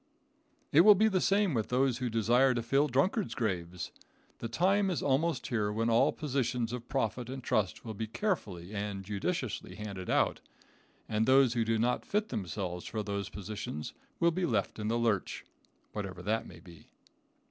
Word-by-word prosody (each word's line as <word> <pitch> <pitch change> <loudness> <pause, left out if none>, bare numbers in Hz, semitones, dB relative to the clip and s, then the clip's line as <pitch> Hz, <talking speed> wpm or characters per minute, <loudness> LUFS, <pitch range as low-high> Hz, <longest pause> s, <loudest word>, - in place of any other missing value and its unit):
It 155 - +7
will 210 +3 +8
be 215 +3 +4
the 190 -3 +1
same 200 -3 +3
with 110 -4 -1
those 125 0 +2
who 125 -2 -1
desire 120 +4 +3
to 120 - -1
fill 135 +5 +3
drunkards' 165 - +1
graves. 90 -6 -3 0.5
The 115 - -3
time 190 - +2
is 180 - -1
almost 140 0 +1
here 105 -4 0
when 115 +2 0
all 125 +6 +4
positions 125 -5 -1
of 120 -1 -6
profit 125 -2 -1
and 130 -1 -6
trust 105 -3 0
will 110 - -4
be 110 +2 -4
carefully 105 - -3
and 100 -2 -4
judiciously 110 - -3
handed 100 -4 -6
out, - - +2 0.7
and 110 0 0
those 130 -2 +5
who 115 -2 +1
do 115 0 +1
not 120 +3 +1
fit 210 +1 -1
themselves 90 -2 -4
for 110 -1 -3
those 100 -1 -3
positions 100 -7 -6 0.3
will 170 0 +4
be 180 +1 -1
left 110 -3 -1
in 105 - -2
the 115 +2 +1
lurch, 115 -5 0 0.5
whatever 95 -4 -5
that 110 +4 -1
may 85 - -12
be. 85 -1 -15
115 Hz, 180 wpm, -31 LUFS, 105-135 Hz, 0.7 s, will